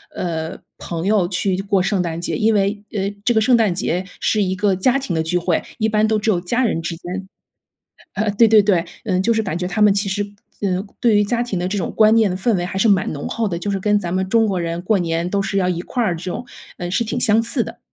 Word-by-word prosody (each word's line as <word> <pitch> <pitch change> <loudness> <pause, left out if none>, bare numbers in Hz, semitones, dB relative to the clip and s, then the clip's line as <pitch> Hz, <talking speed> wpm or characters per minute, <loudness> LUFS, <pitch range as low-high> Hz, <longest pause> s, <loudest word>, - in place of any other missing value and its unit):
呃， 165 0 -3 0.2
朋 170 +2 -4
友 205 -4 +3
去 185 +1 0
过 200 -1 +1
圣 195 -1 0
诞 170 -1 -4
节， - - -2
因 220 0 +2
为， 205 0 0
呃， 200 -1 -1
这 240 - +3
个 220 - +3
圣 240 +2 +4
诞 215 -6 +2
节 180 +1 -1
是 215 -2 +1
一 185 -1 -1
个 195 0 +1
家 255 +9 +2
庭 205 -11 -3
的 160 - +1
聚 175 +2 0
会， 175 -1 0 0.2
一 220 0 +1
般 215 0 +2
都 220 -1 +1
只 215 - -1
有 185 -5 +2
家 235 +9 0
人 220 -8 0
之 165 0 -3
间 185 +3 -6 0.9
呃， 210 +1 0
对 220 +2 +4
对 215 -1 +6
对， 185 -4 +2 0.2
嗯， 185 -4 0
就 230 +3 +2
是 220 - +1
感 190 -6 -3
觉 180 - -2
他 205 +3 0
们 210 - +6
其 200 0 0
实 205 +1 -1 0.4
嗯， 190 +1 -1
对 230 -3 +4
于 205 - +4
家 235 +3 0
庭 225 -7 -3
的 180 - -1
这 205 - -2
种 190 - -2
观 215 0 +5
念 220 -3 +4
的 180 - -2
氛 220 +4 +1
围 175 - -2
还 180 +2 -4
是 220 - +3
蛮 200 +2 +2
浓 - - -5
厚 230 -1 -1
的， 170 -4 -2
就 200 +3 -3
是 195 - -1
跟 205 +2 +2
咱 175 -3 -4
们 190 0 0
中 225 0 +4
国 190 -3 -1
人 170 0 -3
过 195 +3 +1
年 170 0 -1
都 200 +2 0
是 195 -1 -1
要 180 - +1
一 175 -1 -2
块 245 - -2
儿 180 -6 0
这 165 - -9
种， 185 +7 -5 0.3
呃， 175 0 -4
是 235 +6 +1
挺 240 +2 -3
相 220 0 +3
似 235 +1 -1
的。 - - -8
195 Hz, 300 characters per minute, -20 LUFS, 180-215 Hz, 0.9 s, 对